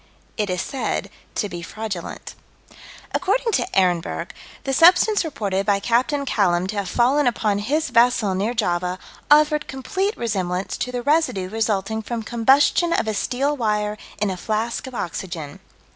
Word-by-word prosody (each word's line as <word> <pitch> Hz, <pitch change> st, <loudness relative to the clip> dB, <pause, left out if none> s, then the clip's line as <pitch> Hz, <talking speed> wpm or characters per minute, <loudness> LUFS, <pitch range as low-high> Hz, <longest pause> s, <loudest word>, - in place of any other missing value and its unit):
It 210 Hz, -2 st, -1 dB
is 180 Hz, 0 st, -1 dB
said 270 Hz, -, -3 dB, 0.2 s
to 210 Hz, -, 0 dB
be 175 Hz, -3 st, -7 dB
fraudulent. 200 Hz, -1 st, -6 dB, 0.8 s
According 440 Hz, +6 st, +1 dB
to 380 Hz, -, +1 dB
Ehrenberg, 180 Hz, -3 st, 0 dB, 0.3 s
the 270 Hz, -, -2 dB
substance 355 Hz, +7 st, +5 dB
reported 200 Hz, -, -2 dB
by 200 Hz, -1 st, +3 dB
Capt. 235 Hz, +6 st, +1 dB
Callam 180 Hz, -7 st, +2 dB
to 215 Hz, -, -3 dB
have 200 Hz, -2 st, -2 dB
fallen 260 Hz, +6 st, +3 dB
upon 215 Hz, -4 st, +1 dB
his 295 Hz, +10 st, -1 dB
vessel, 230 Hz, -4 st, +3 dB
near 205 Hz, +6 st, -1 dB
Java, 180 Hz, -4 st, 0 dB, 0.3 s
"offered 300 Hz, 0 st, +4 dB
complete 380 Hz, -, -2 dB
resemblance 190 Hz, -5 st, -2 dB
to 250 Hz, -, -3 dB
the 245 Hz, -1 st, -3 dB
residue 290 Hz, -, +1 dB
resulting 220 Hz, -1 st, -1 dB
from 230 Hz, +1 st, -4 dB
combustion 270 Hz, +9 st, +3 dB
of 225 Hz, -, 0 dB
a 220 Hz, -, 0 dB
steel 270 Hz, +7 st, 0 dB
wire 210 Hz, -4 st, 0 dB, 0.2 s
in 210 Hz, -2 st, +1 dB
a 185 Hz, -, -4 dB
flask 225 Hz, +7 st, -2 dB
of 260 Hz, -, -9 dB
oxygen." 165 Hz, -6 st, -5 dB
220 Hz, 155 wpm, -22 LUFS, 195-270 Hz, 0.8 s, substance